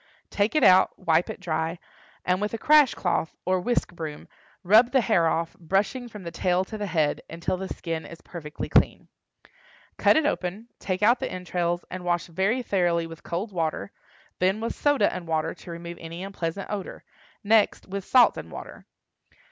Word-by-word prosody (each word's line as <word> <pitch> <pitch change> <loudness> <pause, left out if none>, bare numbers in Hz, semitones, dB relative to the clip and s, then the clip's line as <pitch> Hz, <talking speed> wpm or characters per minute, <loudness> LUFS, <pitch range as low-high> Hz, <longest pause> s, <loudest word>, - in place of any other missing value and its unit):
Take 205 +7 0
it 305 - +3
out, 185 0 +6
wipe 165 +1 +2
it - - -6
dry, 165 -1 -2 0.5
and 180 +2 +1
with 210 +2 -1
a - - -3
crash 295 0 +5
cloth 170 -3 -1
or 185 0 +2
whisk 240 -3 0
broom 160 -3 -7 0.4
rub 220 +6 +6
the 265 - +4
hair 190 -8 +3
off, 165 0 -1
brushing 195 +8 -1
from 210 -3 -10
the 170 - -6
tail 180 +2 +1
to 215 - -8
the 205 - -2
head, 155 -5 0
until 170 +2 -2
the 190 +1 -5
skin 165 -2 -4
is 170 - -11
perfectly 155 -4 -7
clean. - - +2 0.9
Cut - - +5
it 315 - +2
open, 210 -3 -2
take 185 +1 -2
out 240 +4 +5
the - - -3
entrails, 175 -1 -2
and 185 0 -5
wash 175 -1 0
very 195 +9 0
thoroughly 175 -5 +1
with 165 0 -10
cold 185 +6 -4
water, 160 - -2 0.5
then 190 +3 +2
with 230 - -2
soda 290 -8 +2
and 175 -2 -6
water, 160 0 0
to - - -14
remove 170 0 -7
any 165 +2 -7
unpleasant 195 -1 -4
odor; 200 -3 -5 0.4
next 215 0 +3
with 195 0 -4
salt 250 +4 +5
and - - -8
water. - - -10
185 Hz, 185 wpm, -26 LUFS, 170-210 Hz, 0.9 s, out